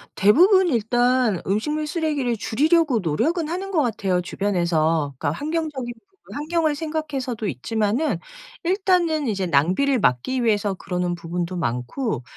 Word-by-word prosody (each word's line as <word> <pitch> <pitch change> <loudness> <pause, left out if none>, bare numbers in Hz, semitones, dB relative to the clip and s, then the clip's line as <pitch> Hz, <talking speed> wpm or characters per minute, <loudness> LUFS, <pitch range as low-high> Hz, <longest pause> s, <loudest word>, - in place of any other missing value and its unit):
대부분 360 - +5
일단 240 - +2
음식물 300 +11 -1
쓰레기를 295 -7 -1
줄이려고 300 +3 +2
노력은 305 - 0
하는 375 +3 -4
것 350 -5 +2
같아요 195 -7 0
주변에서. 165 -6 0
그러니까 145 +2 -2
환경적인 300 -5 -3
부분 390 +11 -30 0.2
환경을 310 +1 0
생각해서도 285 -7 -3
있지만은 220 - -1 0.4
일단은 350 -5 +1
이제 195 -5 -1
낭비를 185 - +2
막기 230 - +1
위해서 205 -3 +1
그러는 180 -1 -2
부분도 175 +1 -4
많고 130 - -2
240 Hz, 350 characters per minute, -23 LUFS, -, 0.4 s, 대부분